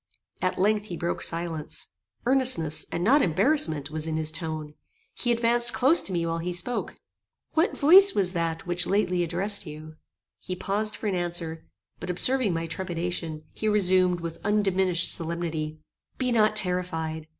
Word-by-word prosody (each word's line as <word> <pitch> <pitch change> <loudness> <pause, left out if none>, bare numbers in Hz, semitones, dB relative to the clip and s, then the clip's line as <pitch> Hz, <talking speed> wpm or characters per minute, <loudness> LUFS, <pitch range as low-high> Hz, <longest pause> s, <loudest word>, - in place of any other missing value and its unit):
At 185 - -1
length, 210 +2 +1
he 175 - -6
broke 170 +1 -3
silence. 165 -2 -3 0.4
Earnestness, 240 - +2
and 170 - -2
not 275 +9 +4
embarrassment, 165 - +1
was 155 0 -4
in 160 -1 -2
his 155 -1 0
tone. 155 -2 -4 0.4
He 240 - -1
advanced 235 +1 +1
close 270 +7 +5
to - - -6
me 170 -2 -1
while 165 0 -2
he 175 +2 -3
spoke. 240 +8 -3 0.6
"What 345 +7 +1
voice 385 +7 +7
was 185 -2 +2
that 165 -1 -2
which 175 0 -1
lately 185 -3 +1
addressed 185 +3 +1
you?" 155 +1 -10 0.4
He 185 - -5
paused 205 +3 -1
for - - -8
an 205 - 0
answer; 170 -2 -2 0.3
but - - -7
observing 250 +5 +2
my 165 0 -2
trepidation, 165 -2 -4
he 220 - -3
resumed, 185 -4 +3
with 165 -1 -7
undiminished 190 -4 +2
solemnity: 165 -2 -3 0.4
"Be 255 -1 -1
not 215 -2 +3
terrified. 165 -5 -1
180 Hz, 160 wpm, -26 LUFS, 165-210 Hz, 0.6 s, voice